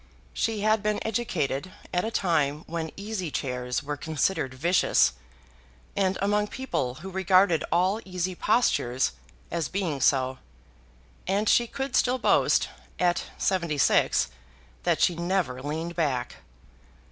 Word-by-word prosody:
She 220 -2 -1
had 215 0 +3
been 210 0 0
educated 185 - -1 0.2
at 180 0 +1
a 220 - -1
time 155 -8 0
when 165 -1 -4
easy 200 -4 -4
chairs 125 -3 -2
were 145 +1 -4
considered 155 -1 -1
vicious, 170 - +3 0.8
and 190 -1 +1
among 210 +1 +2
people 170 - -3
who 190 - -6
regarded 185 -2 +3
all 185 +6 +2
easy 185 -1 -3
postures 175 - +1 0.4
as 170 -2 -1
being 175 -8 -2
so; 130 -1 +2 0.9
and 200 +3 +1
she 240 +3 +4
could 270 +3 -4
still 250 +1 +3
boast, 245 - +3 0.3
at 175 -1 +1
seventy 170 -6 0
six, - - +3 0.6
that - - +2
she 175 - +4
never 170 -7 -1
leaned 160 +4 -4
back. 140 -7 -1
180 Hz, 130 wpm, -27 LUFS, 150-200 Hz, 0.9 s, she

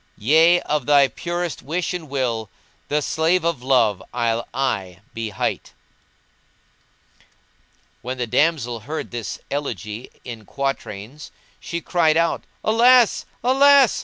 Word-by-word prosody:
Yea, 160 +9 +5
of 150 0 -2
my 140 -2 +6
purest 175 +4 -4
wish 165 +6 -2
and 165 -5 -6
will 120 -6 -2 0.2
* - - -38
The 150 0 0
slave 165 +5 +1
of 165 -6 -1
Love 120 -7 +2
I'll 115 -1 -1
aye 95 -9 -2
be 115 -1 -4
hight." 105 - -3 2.3
When 130 +1 -5
the 125 - -1
damsel 125 -2 +1
heard 150 +9 -6
this 120 -2 -5
elegy 115 -5 -4 0.2
in 115 -3 -8
quatrains 135 -1 -5 0.3
she 170 0 -5
cried 160 -3 +2
out 170 0 0 0.2
"Alas! 240 +1 +4 0.2
Alas!" 270 0 +5
140 Hz, 125 wpm, -22 LUFS, 115-170 Hz, 2.3 s, my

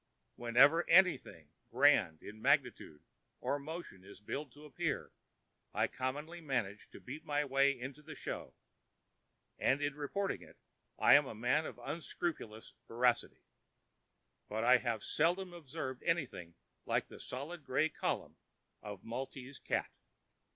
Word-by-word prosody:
Whenever 135 +8 +5
anything 165 - +4 0.2
grand 120 - +4
in 110 +1 -10
magnitude 125 - +1 0.4
or 145 - -1
motion 150 - -7
is 100 - -13
billed 140 +6 -5
to 145 +4 -14
appear 145 - -2 0.6
I - - +3
commonly 150 +7 -4
manage 115 -9 -2
to - - -12
beat 145 +5 -8
my 145 0 0
way 140 0 +3
into 135 +4 -7
the 155 +1 -9
show, - - -6 1.0
and 135 - +3
in 145 -1 0
reporting 170 +8 -2
it - - -15 0.4
I - - +6
am 145 -1 +7
a - - -6
man 125 +8 +1
of - - -8
unscrupulous 140 -4 -4
veracity; 120 +1 +1 1.1
but 110 +2 -1
I 125 +2 +7
have 115 -4 -2
seldom 175 +3 +1
observed 140 -5 -6
anything 135 - -2 0.3
like - - +1
that - - -11
solid 145 +5 -6
gray 140 +4 +2
column 160 - -3 0.4
of 105 -3 -8
Maltese 130 +3 -6
cat! - - -1
135 Hz, 135 wpm, -35 LUFS, 120-155 Hz, 1.1 s, am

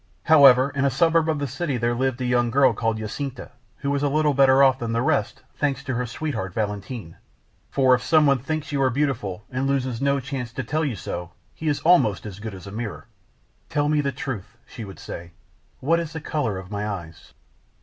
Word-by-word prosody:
However, 140 -4 +7
in 140 -1 0
a 140 - +4
suburb 165 +4 +2
of 155 - +1
the 145 - -2
city 135 +1 -2
there 120 +1 0
lived 130 +1 -1
a - - -1
young 120 -1 +2
girl 130 +2 +4
called 115 -2 -1
Jacinta, 125 +5 -5 0.3
who 140 0 -2
was 140 -1 0
a 145 - +2
little 150 0 +2
better 135 0 +5
off 130 -1 +4
than 115 -1 -3
the 115 - +1
rest, 135 -8 0
thanks 140 -2 -1
to 135 -2 -3
her 125 0 -2
sweetheart, 115 - -4
Valentin. 105 -3 -4 0.5
For 130 -2 +4
if 125 - +2
someone 145 -1 +4
thinks 155 +4 -4
you 140 -1 0
are 130 - +4
beautiful, 115 -8 -2
and 130 +1 -1
loses 130 -3 -1
no 140 0 +2
chance 130 -3 -5
to - - -3
tell 155 +2 -1
you 140 -6 -1
so, 90 -3 -6 0.2
he 160 - -6
is 145 -1 0
almost 155 - +3
as 105 -2 -8
good 110 -2 -6
as 95 - -11
a 100 - -8
mirror. 110 -2 -5 0.6
"Tell 145 0 +1
me 150 -1 +3
the 140 -1 -1
truth," 120 -4 -6
she 115 - -9
would 95 -2 -9
say; 85 0 -8 0.5
"what 165 +5 +2
is 165 -2 -5
the 160 - -4
color 145 -9 -2
of 95 +1 -9
my 105 0 -2
eyes?" 85 -6 -8
130 Hz, 220 wpm, -24 LUFS, 110-145 Hz, 0.6 s, However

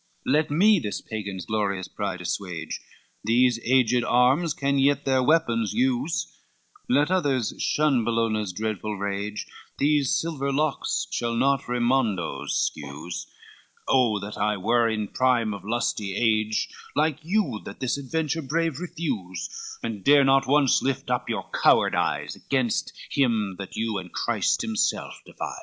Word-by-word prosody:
LXIII - - +1
"Let 150 +1 +2
me 195 +7 +5
this 105 -8 -3
Pagan's 100 -5 -6
glorious 100 -4 -1
pride 95 -3 -4
assuage, 85 -3 -4 0.4
These 120 +1 +3
aged 125 -1 +3
arms 130 +8 +3
can 140 0 +1
yet 140 +1 +2
their 130 -1 +3
weapons 120 -7 +2
use, 130 +6 -1 0.5
Let 145 +6 +3
others 140 - +1
shun 145 -6 +2
Bellona's 110 -3 0
dreadful 105 +1 -3
rage, 100 +1 -3 0.3
These 145 -1 +2
silver 145 -4 -2
locks 145 +1 0
shall 115 -1 -1
not 135 +2 +1
Raymondo 115 - 0
scuse: 75 +5 -3 0.6
Oh 120 -5 +3
that 100 +1 -7
I 105 0 +1
were 115 +4 +2
in 110 -2 -2
prime 120 -2 +1
of 100 - -8
lusty 105 -3 -2
age, 110 -1 +1 0.3
Like 155 -1 +1
you 175 - 0
that - - -9
this 130 - 0
adventure 160 +3 -2
brave 160 +1 -1
refuse, 110 - -4 0.3
And 110 -4 -4
dare 145 0 +6
not 135 0 +4
once 140 -1 +4
lift 135 -1 -2
up 125 -1 -1
your 110 -4 -3
coward - - +4
eyes, - - -1
Gainst 130 -5 0 0.2
him 110 -8 +1
that 100 - -7
you 110 -3 -1
and 90 -2 -10
Christ - - 0
himself - - -1
defies! - - -6
120 Hz, 145 wpm, -25 LUFS, 105-140 Hz, 0.6 s, dare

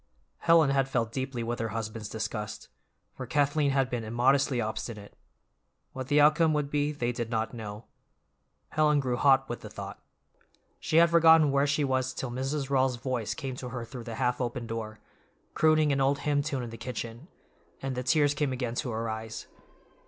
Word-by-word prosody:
Helen 165 -4 +5
had 135 -1 +2
felt 115 -4 0
deeply 130 -1 -3
with 120 +1 -3
her 115 - -1
husband's 110 0 -5
disgust, 105 -1 -5 0.4
for - - -7
Kathleen 145 0 +2
had 135 -1 +2
been 120 -2 -3
immodestly 125 +4 +2
obstinate; 110 -1 -5 0.8
what 130 -1 -5
the 145 +1 +3
outcome 155 +2 +5
would 145 -1 -1
be 145 0 +1
they 125 -5 -2
did 120 -1 -4
not 110 -1 -1
know; 110 -1 -7 0.8
Helen 150 -1 +3
grew 130 -3 -1
hot 135 +1 +4
with 120 - -5
the - - -8
thought. - - -8 0.8
She 160 - 0
had 170 0 +6
forgotten 160 -3 +6
where 140 +1 +2
she 145 +1 +1
was 130 -1 0
till 130 - -4
Mrs. 135 +2 -3
Rawls's 130 -2 +2
voice 120 -2 -3
came 135 -2 -5
to 125 - -6
her 125 -1 -5
through 120 0 -9
the 115 -2 -6
half 125 +1 0
open 120 -1 -3
door, 110 -1 -5 0.5
crooning 155 -1 +3
an 135 -1 +1
old 135 +1 +3
hymn 145 -1 +1
tune 140 -3 -3
in 120 - -6
the 115 - -8
kitchen; 120 +3 -6 0.5
and 135 0 -3
the 125 - -3
tears 145 +3 +3
came 145 -1 -1
again 125 -2 -3
to 125 +1 -2
her 115 0 -3
eyes. 110 0 -5
130 Hz, 190 wpm, -28 LUFS, 115-145 Hz, 0.8 s, had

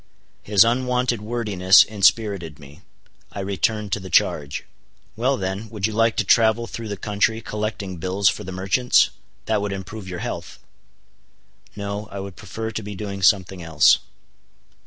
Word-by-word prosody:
His 100 -2 +5
unwonted 125 -1 0
wordiness 105 -4 +4
inspirited 100 -6 +1
me. 70 -1 -15 0.5
I - - -7
returned 100 +2 -1
to - - 0
the 95 -1 -9
charge. 70 -3 +1 0.5
"Well 130 +4 +1
then, 95 +3 -4
would 105 -4 -3
you 110 - -1
like 115 +1 +2
to - - +2
travel 115 0 +3
through 115 -1 -7
the 100 -1 -5
country 105 +3 0
collecting 105 -4 -4
bills 95 +3 0
for 95 - +1
the 95 - -7
merchants? 95 +7 +2 0.3
That 110 -2 0
would 100 -1 -2
improve 100 +1 -7
your 90 - -5
health." - - -6 1.2
"No, 100 0 -5
I 100 - -7
would 95 -1 -7
prefer 110 0 -6
to 110 - -4
be 105 -1 -7
doing 100 -1 -6
something 95 -2 +2
else." 80 -2 +4
100 Hz, 155 wpm, -22 LUFS, 95-110 Hz, 1.2 s, His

